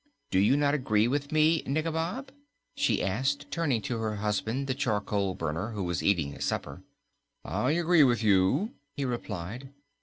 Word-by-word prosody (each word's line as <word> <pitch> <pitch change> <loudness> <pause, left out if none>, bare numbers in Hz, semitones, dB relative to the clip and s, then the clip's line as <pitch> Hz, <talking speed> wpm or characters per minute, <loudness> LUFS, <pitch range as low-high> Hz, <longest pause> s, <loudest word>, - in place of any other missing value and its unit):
Do 95 - +3
you 105 +8 +4
not 145 -1 +2
agree 115 -6 +2
with 140 +2 -2
me, 155 +1 +4
Nikobob?" 165 - -2 0.4
she - - +1
added, 135 +9 0
turning 140 -10 0
to 120 -2 -2
her 110 -1 -2
husband, 105 +5 -1
the 135 - -1
charcoal 105 -7 -1
burner, 80 +8 -3
who 100 -2 -3
was 90 -1 -2
eating 85 -8 +1
his - - -6
supper. - - -3 0.6
"I 130 +4 0
agree 170 -1 +4
with 120 -4 +2
you," 100 - +3 0.2
he 140 - -1
replied. 120 0 -5
125 Hz, 160 wpm, -29 LUFS, 105-145 Hz, 0.6 s, you